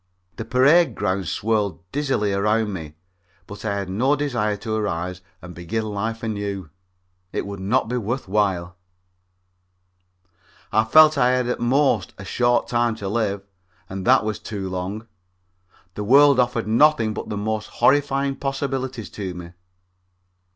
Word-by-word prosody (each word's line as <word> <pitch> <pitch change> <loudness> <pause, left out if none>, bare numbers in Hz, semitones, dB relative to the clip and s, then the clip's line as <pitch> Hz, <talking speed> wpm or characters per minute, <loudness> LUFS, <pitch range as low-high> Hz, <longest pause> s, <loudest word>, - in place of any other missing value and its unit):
The 110 - -5
parade 140 +9 +4
ground 95 -1 -1
swirled 105 +3 -1
dizzily 135 -8 0
around 105 +1 +1
me, 80 -4 -7 0.5
but 100 - -10
I 105 -2 -1
had 100 -2 -3
no 125 +10 +1
desire 120 -8 -1
to 110 +2 -5
arise 90 -4 -2 0.2
and 90 0 -9
begin 90 +6 -3
life 110 +2 -4
anew. 100 -6 -4 0.6
It - - -3
would 100 -1 -7
not 110 +6 +1
be 125 +2 -2
worth 120 +2 -3
while. 95 -3 0 1.9
I 110 +1 +3
felt 155 +7 +7
that 140 -4 +2
I 125 - +4
had 125 -1 0
at 125 - -2
the - - -3
most 130 -1 +2
only 95 - -9
a - - -11
short 120 +3 +1
time 120 -1 +1
to 100 -3 -6
live, 100 -2 -1 0.4
and 95 0 -6
that - - +6
that - - -7
was 110 0 -2
too 100 -3 -5
long. 95 +4 -4 0.9
The 105 - -4
world 140 +4 +6
offered 120 -2 +1
nothing 115 -1 +3
but - - -6
the 105 - -3
most 110 +1 -2
horrifying 140 -1 +1
possibilities 135 -4 -3
to 95 -4 -5
me. 85 -1 -9
110 Hz, 160 wpm, -22 LUFS, 100-125 Hz, 1.9 s, felt